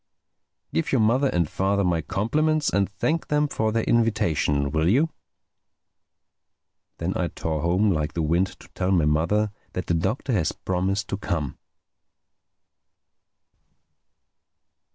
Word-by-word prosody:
Give 80 - 0
your 135 - +3
mother 125 +6 +3
and 85 -6 +1
father 100 +4 0
my 85 -3 +1
compliments 155 - +1
and 100 -1 +1
thank 155 +11 -1
them 150 0 +2
for 110 -6 -1
their 115 0 0
invitation, 80 -11 +1
will 80 +3 +2
you?" 145 +10 +3 1.9
Then - - -2
I - - 0
tore 80 -2 -3
home 90 +5 +2
like 75 -3 -1
the 85 - -1
wind 85 +5 +2
to - - -14
tell 90 - -1
my 90 -5 +3
mother 85 +8 +1 0.2
that 90 - -3
the - - 0
Doctor 110 +10 -1
had 90 -8 +1 0.2
promised 95 +3 0
to 100 - -2
come. 80 -8 -3
95 Hz, 130 wpm, -24 LUFS, 80-110 Hz, 1.9 s, your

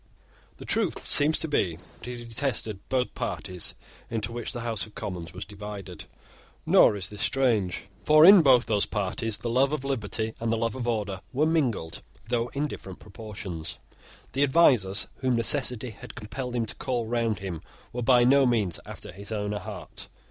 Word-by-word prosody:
The - - -10
truth - - 0
seems 150 +2 +4
to 160 - 0
be 90 - +1
that 90 +5 -15
he 120 -1 -6
detested 115 -4 0
both 125 -1 +1
the - - -14
parties 90 -3 -3 0.3
into 115 -1 -2
which 120 -1 -5
the 120 - -4
House 115 -3 -2
of 105 - -19
Commons 85 -4 -5
was 90 +3 -7
divided: 100 -4 -8 0.6
nor - - +6
is 95 -1 -1
this 105 0 -7
strange; 115 -9 +1 0.2
for 155 +1 +7
in 195 0 +10
both 130 -5 +5
those 105 -3 +1
parties 105 +2 -1
the 120 - -4
love 135 +3 +3
of 150 -3 -2
liberty 110 -4 -2
and 115 0 -1
the 115 - +1
love 115 -1 -1
of 125 -2 -4
order 105 -5 -2
were 145 +4 +2
mingled, 130 - 0 0.3
though 120 -1 0
in 145 +2 0
different 95 -9 -8
proportions. 105 -6 -7 0.6
The 135 - 0
advisers 130 - +4
whom 130 -2 +1
necessity 125 0 +1
had 125 +4 -11
compelled 125 +2 -5
him 115 -2 0
to 110 - -5
call 125 -4 -1
round 115 -2 0
him 95 -5 -5 0.3
were 125 - -3
by 120 0 +5
no 135 +2 +5
means 105 -8 +1
after - - -8
his 100 +2 -9
own 105 -1 -2
heart. 105 -3 -6
115 Hz, 185 wpm, -27 LUFS, 105-130 Hz, 0.6 s, in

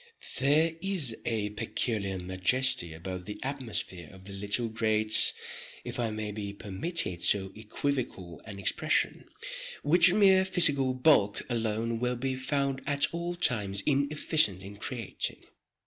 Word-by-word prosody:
There 150 +5 +3
is 180 - 0
a 105 -3 -1
peculiar 105 -2 -1
majesty 95 +2 +2
about 90 +3 -7
the 105 - -7
atmosphere 115 - -5
of 95 -1 -15
the 100 +1 -9
little 105 +4 -1
great—if 110 +1 0
I 115 -2 0
may 110 -1 -4
be 100 -1 -5
permitted 100 - -2
so 95 0 +2
equivocal 110 -5 -4
an 105 -3 -8
expression—which 155 - +1
mere 190 -2 +5
physical 145 -9 +4
bulk 125 -7 +3
alone 115 0 -1
will 125 +1 -1
be 130 +2 -2
found 135 0 -1
at 145 +2 +1
all 170 +1 -3
times 105 - 0
inefficient 140 - +2
in 100 +1 -10
creating. 115 -1 -4
115 Hz, 125 wpm, -29 LUFS, 100-140 Hz, -, mere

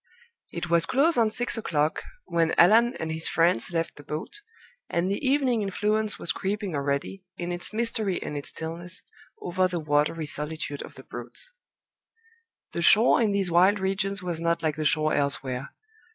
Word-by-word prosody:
It - - -4
was 165 -1 +3
close 305 +6 +3
on 230 -2 +3
six 230 +1 0
o'clock 155 -7 0 0.2
when 165 -1 +1
Allan 230 +7 +5
and 160 0 -4
his 160 +1 0
friends 165 -4 +2
left 165 -1 -2
the 145 - -11
boat, 155 - -6 0.5
and 175 +3 0
the 200 - -3
evening 265 -4 +2
influence 210 +2 0
was - - 0
creeping 200 -1 -3
already, 140 +6 -2
in 175 0 -4
its 175 0 0
mystery 220 -4 -1
and 150 - -6
its 145 - -4
stillness, 170 +3 -6 0.4
over 185 +1 +1
the 180 -2 -3
watery 150 +1 0
solitude 150 0 -4
of - - -10
the - - -12
Broads. - - -8 1.2
The 170 - -3
shore 220 +8 +6
in 220 -3 +2
these 195 -3 +1
wild 185 +5 +5
regions 195 +1 -1
was 170 -2 -3
not 170 -1 0
like 155 -2 0
the 155 0 -3
shore 155 0 +3
elsewhere. 140 -2 -1
175 Hz, 170 wpm, -26 LUFS, 160-210 Hz, 1.2 s, shore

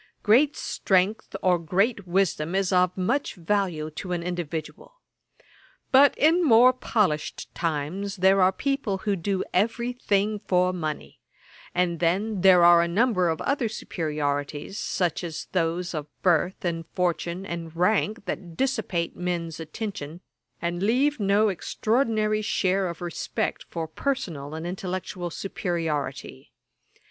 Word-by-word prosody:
Great 265 +8 +4
strength 190 +3 0
or 180 -2 +3
great 195 +5 0
wisdom 175 -2 0
is 195 -1 +1
of 180 0 +3
much 235 +10 0
value 175 -4 -1
to 180 +4 -5
an 170 -1 -2
individual. 175 - -5 1.0
But 275 +2 +6
in 330 +4 +4
more 250 -2 +6
polished 200 -11 -1
times 170 +5 -2
there 190 0 +4
are 185 0 +5
people 275 -2 -1
to 200 +1 -1
do 190 +2 -1
every 235 +5 +1
thing 210 -3 0
for 180 0 +2
money; 155 -4 -5 0.6
and 175 -2 +1
then 190 +4 0
there 185 -2 +7
are 175 0 +7
a 170 - +1
number 185 -1 +2
of 160 - -2
other 270 -5 0
superiorities, 150 -3 -3
such 180 -3 -1
as 165 -3 -5
those 175 0 -1
of 150 -2 -4 0.2
birth 180 +3 +1
and 165 -2 -2
fortune, 175 +1 -1
and 170 -3 -6
rank, 210 +4 +1
that 175 -5 -6
dissipate 220 -10 -1
men's 170 -2 -3
attention, 165 -1 -6 0.4
and 175 +1 -3
leave 255 +7 +2
no 205 +1 +3
extraordinary 215 +3 0
share 190 -2 +1
of 170 0 -6
respect 175 -2 -3
for 165 -2 -4
personal 160 - -3
and 160 +1 -5
intellectual 180 -1 -4
superiority. 160 - -4
180 Hz, 135 wpm, -25 LUFS, 170-210 Hz, 1.0 s, there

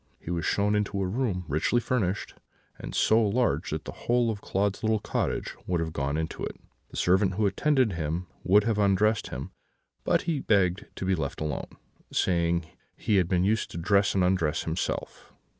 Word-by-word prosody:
He 85 - -6
was 85 -2 -1
shown 105 +1 +2
into 105 -1 0
a 95 - 0
room 100 -4 -1
richly 80 - +1
furnished, 105 -6 -1 0.5
and - - -7
so 110 +1 +4
large 115 +4 +1
that - - -4
the - - -5
whole 120 -1 +1
of 105 -2 -6
Claude's 100 +1 -1
little 110 0 +2
cottage 105 - -2
would 90 -2 +1
have 80 -1 -3
gone 70 0 -1
into 80 0 -3
it. - - -5 0.3
The - - -9
servant 95 +1 +3
who 105 +1 +1
attended 130 +4 +2
him 85 +2 -2 0.2
would 100 +3 +5
have 110 -1 0
undressed 105 +2 +2
him; 65 +2 -6 0.5
but - - +2
he 165 -4 -1
begged 95 -5 +1
to - - -4
be 95 - +2
left 80 -6 -3
alone, 75 -3 -4 0.3
saying 85 -2 +1 0.3
he 105 - +1
had 90 -3 +3
been 90 -1 +2
used 110 +3 +1
to - - -7
dress 100 +3 +2
and 95 - +3
undress 85 -4 +1
himself. 80 +1 -4
95 Hz, 190 wpm, -27 LUFS, 85-105 Hz, 0.5 s, would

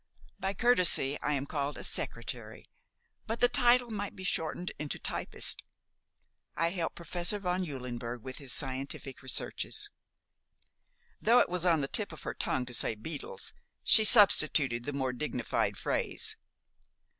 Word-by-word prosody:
By 195 +1 -3
courtesy 180 - +4
I 150 - -1
am 140 -1 -2
called 145 0 -4
a - - -8
'secretary'; - - -6 0.6
but 225 +1 -4
the 245 - +5
title 245 0 +2
might 205 -1 -5
be 190 - -10
shortened 175 0 -3
into 150 -1 -4
'typist.' - - -2 0.9
I 165 +1 0
help 170 -3 -4
Professor 175 +3 -1
von 185 -1 -2
Eulenberg 125 -6 -6
with 130 -1 -7
his 140 -3 -3
scientific 135 0 -2
researches." 415 - +1 1.3
Though 235 +3 +4
it - - +3
was 180 0 -1
on 165 -3 +2
the 135 - -2
tip 205 +6 +2
of 160 - -11
her - - -5
tongue 125 - -2
to 125 - -8
say 115 - +2
"beetles," 290 - -7 0.3
she 220 - +7
substituted 155 - +6
the 145 - -4
more 130 -2 -2
dignified 125 -2 -2
phrase. - - -2
160 Hz, 145 wpm, -30 LUFS, 135-200 Hz, 1.3 s, she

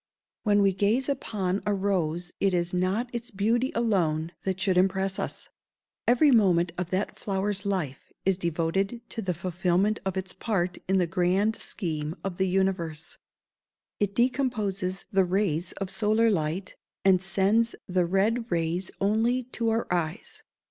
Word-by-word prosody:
"] - - -66
When 205 -1 +4
we 195 -1 +4
gaze 210 +7 +1
upon 205 -8 -1
a 205 -1 +1
rose 175 -3 -1
it 195 -2 +2
is 175 0 -1
not 195 +7 0
its 240 0 -4
beauty 230 +5 +1
alone 170 -9 +1
that 190 -1 -2
should 190 -1 +1
impress 190 +1 +1
us: - - -4 0.6
every 250 +5 +5
moment 180 -7 +4
of 180 -1 -3
that 190 +3 -2
flower's 195 0 -1
life 165 -9 -3
is 190 -1 +2
devoted 175 +6 -1
to 225 - -4
the 185 -4 -2
fulfilment 185 +4 +1
of 190 -1 -2
its 190 0 -3
part 185 -5 -1
in 190 +1 +3
the 180 - +3
grand 185 +6 +1
scheme 155 -7 -3
of 190 -3 -4
the 190 - +2
universe. 180 -4 -1 0.8
It 200 -1 0
decomposes 215 -7 0
the 195 -1 +4
rays 180 -3 0
of 195 -1 -4
solar 220 +1 +3
light, 170 +1 -2 0.3
and 185 -2 +5
sends 200 +5 +2
the 180 -1 +1
red 220 +6 +1
rays 170 +2 0
only 225 +5 +2
to 230 -1 0
our 225 +1 +1
eyes. 165 -2 -3
190 Hz, 155 wpm, -27 LUFS, 180-210 Hz, 0.8 s, every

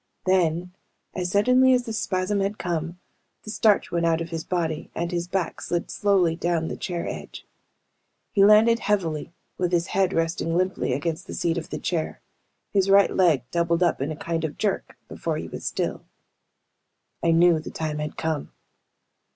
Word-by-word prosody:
Then, 180 -1 +1 0.4
as 180 -1 -2
suddenly 250 +6 +5
as 245 - 0
the 225 - -5
spasm 195 -1 -1
had 200 +2 -1
come, 170 -1 -3 0.5
the 215 - -6
starch 215 -2 +2
went 170 0 0
out 165 -1 +2
of 170 0 -5
his 165 -1 -3
body 165 -4 -2
and 170 +1 -2
his 175 -1 -2
back 185 -2 -2
slid 175 -1 -2
slowly 190 -5 +2
down 170 -1 -1
the - - -4
chair 175 -2 -4
edge. - - -7 0.9
He 200 - +4
landed 220 +3 +6
heavily 170 -10 -1 0.3
with 180 -1 0
his 170 -1 +2
head 190 -1 +2
resting 165 -1 0
limply 185 -6 0
against 165 +6 -3
the - - -6
seat 170 0 0
of 165 - -10
the - - -4
chair. 165 -3 -2 0.5
His 195 -1 +2
right 200 0 +6
leg 165 -9 +4
doubled 170 0 +1
up 170 -6 +1
in 140 - -1
a - - -4
kind 165 +1 -3
of 155 -2 -3
jerk, 205 -2 -2
before - - -3
he - - -5
was - - -8
still. - - -2 1.2
I 170 - +1
knew 165 0 +5
the 155 - -7
time 155 -2 -3
had 150 0 -5
come. 160 -3 -2
175 Hz, 180 wpm, -25 LUFS, 165-195 Hz, 1.2 s, landed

